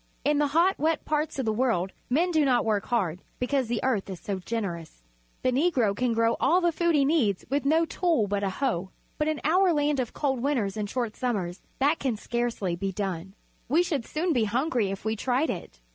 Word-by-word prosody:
In 295 0 +3
the 295 - +3
hot, 335 +7 +2
wet 315 +1 0
parts 305 0 -1
of 265 - -1
the 220 - +1
world 215 -6 +1 0.2
men 335 +8 +2
do 315 -3 +3
not 255 -3 +2
work 210 -3 0
hard, 185 -8 0 0.2
because 260 0 0
the 230 -1 -2
earth 225 -7 0
is 185 -3 -6
so 195 -2 -4
generous. 175 - -5 0.4
The 255 - +3
Negro 255 - +2
can 245 +1 0
grow 230 0 +2
all 355 - +4
the 345 -1 +2
food 340 0 +1
he 280 -2 +4
needs 255 - +1
with 280 0 0
no 320 +3 +4
tool 325 - +1
but 200 0 -1
a 195 - +1
hoe. 190 -5 -1 0.3
But 300 - +1
in 310 -2 0
our 360 +5 +4
land 295 -2 +1
of 245 -3 -2
cold 265 -4 -1
winters 240 -8 0
and 210 -2 -3
short 235 -2 -2
summers 195 -8 -2 0.2
that 290 +4 +2
can 255 -5 -1
scarcely 230 -6 -2
be 195 +3 -2
done. 190 -1 -4 0.3
We 320 +7 +4
should 300 -9 -1
soon 330 +2 0
be 235 -5 +2
hungry 240 - 0
if 195 +2 -6
we 220 0 0
tried 255 +7 0
it. 170 - -8
250 Hz, 220 wpm, -27 LUFS, 205-300 Hz, 0.4 s, all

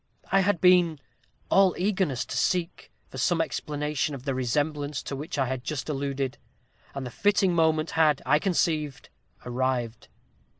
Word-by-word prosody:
I 195 - +5
had 195 -2 +2
been 180 -3 +5 0.5
all 195 -2 +5
eagerness 185 -9 0
to - - -6
seek 170 +7 -1 0.2
for 130 - -7
some 165 +7 +2
explanation 150 -1 -2
of 130 - -10
the 135 - 0
resemblance 145 +3 -1
to 140 - -5
which 150 +4 -5
I 135 - +2
have 130 0 -3
just 140 +1 -4
alluded, 140 -2 -2 0.6
and 135 -1 -4
the 125 - -6
fitting 200 - +2
moment 160 -1 +2
had, 155 -3 +3
I 150 +3 +4
conceived, 155 -6 -1 0.4
arrived. 120 - -2
150 Hz, 155 wpm, -26 LUFS, 130-170 Hz, 0.6 s, I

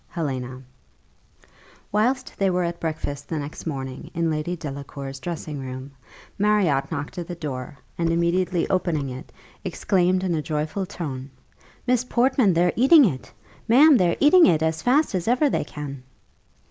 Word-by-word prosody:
HELENA 130 -6 -4 1.3
Whilst 250 +5 0
they 195 -1 +1
were 180 0 +1
at 170 0 -3
breakfast 145 -3 -4
the 160 - -2
next 150 +3 -6
morning 135 -3 -5
in 165 -1 +1
Lady 155 +3 -2
Delacour's 140 -3 -7
dressing 155 -2 -5
room, 130 +1 -7 0.5
Marriott 190 -10 +2
knocked 145 +5 -4
at 170 - -5
the 175 - -5
door, 140 -3 -6 0.2
and 170 -1 +1
immediately 170 +1 +1
opening 165 -7 0
it, 130 +1 -9 0.3
exclaimed 185 -1 +1
in 180 -2 0
a 155 - 0
joyful 155 +6 -3
tone, 135 -7 -6 0.6
"Miss 250 -1 +2
Portman, 250 -4 +2
they're 175 +1 +3
eating 275 +4 +7
it! 135 - -3 0.4
Ma'am, 280 +6 +7
they're 180 -7 +2
eating 335 +4 +7
it 160 -2 +3
as 160 0 0
fast 275 +3 +2
as 185 0 -2
ever 255 +4 +3
they - - 0
can!" 145 -3 -7
170 Hz, 155 wpm, -24 LUFS, 145-195 Hz, 1.3 s, eating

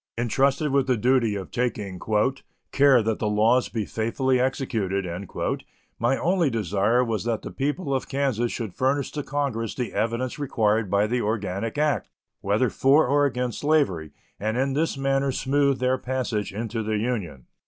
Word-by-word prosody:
Intrusted 135 +5 +1
with 135 -1 +2
the 130 -2 +2
duty 120 -2 +2
of 95 -2 -6
taking 105 -6 -2 0.7
"care 135 -4 +5
that 110 0 -1
the 105 - 0
laws 110 +4 +3
be 110 -3 -2
faithfully 125 +5 0
executed," 110 -7 -1 0.9
my 120 +4 +2
only 175 -3 +2
desire 110 +2 +1
was 115 -3 -2
that 115 -2 -2
the - - -6
people 145 +2 -2
of 130 - -2
Kansas 130 -4 0
should 110 -6 -4
furnish 135 +1 0
to 150 - -3
Congress 135 -6 -2
the 125 -3 -3
evidence 115 +6 -1
required 110 -6 +1
by 100 +2 +3
the 120 +3 0
organic 105 +1 -2
act, 150 -1 0 0.3
whether 105 +6 +1
for 140 +4 +4
or 145 +2 +3
against 125 -3 -3
slavery, 125 - +1 0.3
and 110 +4 -1
in 135 +1 +1
this 155 0 0
manner 135 0 +1
smooth 140 +1 +1
their 130 +1 +1
passage 125 -5 -2
into 115 +2 -3
the 110 0 -1
Union. 105 - -3
125 Hz, 165 wpm, -25 LUFS, 110-135 Hz, 0.9 s, care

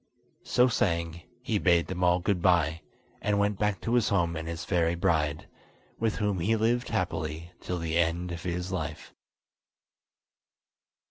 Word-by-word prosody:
So 125 0 +4
saying, 85 -7 0 0.2
he 115 -5 0
bade 85 -3 +3
them 90 -1 -3
all 90 0 +5
goodbye, 85 -4 +2 0.4
and 105 0 +1
went 100 -1 +1
back 105 -3 +1
to 115 - -2
his 120 -3 +3
home 85 -4 +1
and 80 0 -5
his 85 0 -5
fairy 85 -2 +1
bride, 80 -4 0 0.5
with 110 -2 0
whom 105 -3 0
he 105 +7 +2
lived 120 +3 +1
happily 80 +2 -2
till 90 - -3
the 85 0 -1
end 85 +1 0
of 85 -1 -5
his 90 +1 -3
life. 80 -4 -5
90 Hz, 150 wpm, -28 LUFS, 85-100 Hz, 0.5 s, all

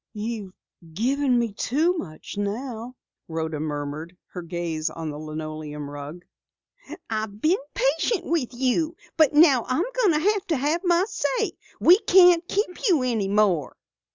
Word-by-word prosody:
"You've 210 -3 -5 0.4
given 260 +4 +1
me 235 -3 0
too 315 - +1
much 160 - -7
now," 230 +4 -4 0.3
Rhoda 160 -2 -3
murmured, 150 +3 -5
her 180 - -7
gaze 170 -2 -3
on 160 -2 -5
the 145 - -7
linoleum 155 -1 -6
rug. 145 +5 -8 0.8
"I've 215 -2 -4
been 335 - +2 0.2
patient - - +1
with 315 -8 -1
you, 265 +6 0 0.2
but 315 -3 +4
now 290 -6 +6
I'm 285 +8 +1 0.2
going 335 -8 +4 0.3
to 320 - +1
have 300 +6 0
my 350 0 +3
say. 455 0 -1 0.3
We 360 +4 +7
can't 355 -4 +5
keep 395 -3 -1
you 315 -8 +3
any 225 -6 0
more." 195 -7 +1
230 Hz, 140 wpm, -24 LUFS, -, 0.8 s, We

